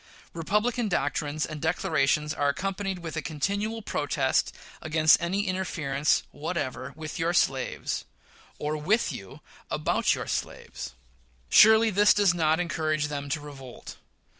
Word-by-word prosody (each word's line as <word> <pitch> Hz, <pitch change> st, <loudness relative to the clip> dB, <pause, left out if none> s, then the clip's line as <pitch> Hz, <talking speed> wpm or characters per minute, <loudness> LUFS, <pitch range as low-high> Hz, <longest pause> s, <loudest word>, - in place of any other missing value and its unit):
Republican 210 Hz, +7 st, 0 dB
doctrines 150 Hz, -4 st, -1 dB
and 150 Hz, -1 st, -7 dB
declarations 150 Hz, -2 st, +1 dB
are 145 Hz, -2 st, +1 dB
accompanied 195 Hz, +4 st, -2 dB
with 165 Hz, -2 st, -7 dB
a 155 Hz, -, -1 dB
continued 200 Hz, +9 st, -2 dB
protest 140 Hz, -2 st, 0 dB, 0.3 s
against 155 Hz, 0 st, +4 dB
any 190 Hz, +4 st, -1 dB
interference 155 Hz, -7 st, 0 dB
whatever 145 Hz, -4 st, -4 dB
with 155 Hz, +3 st, -7 dB
your 165 Hz, +1 st, +1 dB
slaves, 135 Hz, -6 st, 0 dB, 0.5 s
or 150 Hz, +1 st, -2 dB
with 190 Hz, +10 st, +1 dB
you 95 Hz, -1 st, -9 dB, 0.3 s
about -, -, +1 dB
your -, -, -5 dB
slaves. 60 Hz, -, -5 dB, 0.5 s
Surely, 220 Hz, +1 st, +7 dB
this 205 Hz, +1 st, +5 dB
does 200 Hz, -4 st, +4 dB
not 160 Hz, -1 st, +2 dB
encourage 155 Hz, -3 st, -1 dB
them 145 Hz, -1 st, -4 dB
to 150 Hz, -, -1 dB
revolt. 135 Hz, -4 st, -10 dB
160 Hz, 130 wpm, -27 LUFS, 145-190 Hz, 0.5 s, Surely